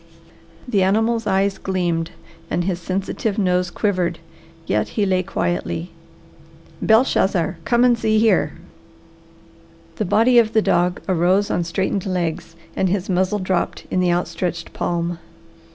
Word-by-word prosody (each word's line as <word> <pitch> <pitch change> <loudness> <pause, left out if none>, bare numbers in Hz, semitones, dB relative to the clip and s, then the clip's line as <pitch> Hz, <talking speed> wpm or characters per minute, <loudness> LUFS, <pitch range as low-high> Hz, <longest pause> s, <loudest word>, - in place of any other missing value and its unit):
The 205 -5 +1
animal's 225 +4 +1
eyes 195 +1 +1
gleamed 175 -3 -1 0.4
and 175 - 0
his 180 -1 -2
sensitive 195 +3 -2
nose 180 -3 +1
quivered, 185 -3 -1 0.5
yet - - 0
he 210 - +3
lay 185 -1 +2
quietly. 85 - -3 0.9
"Belshazzar, 195 -7 +2
kommen 240 0 +4
Sie 220 -1 +1
hier!" 220 0 +3 1.4
The 215 - -1
body 230 +6 +4
of 225 -1 +2
the 220 - +4
dog 175 +1 +1
arose 185 +2 +2
on 175 - 0
straightened 190 +3 -2
legs 170 -2 -3 0.2
and 190 - +1
his 195 0 -1
muzzle 185 +3 +1
dropped 185 -2 -2
in - - +1
the 180 -1 +2
outstretched 175 0 -2
palm. 170 0 -2
185 Hz, 130 wpm, -21 LUFS, 175-210 Hz, 1.4 s, kommen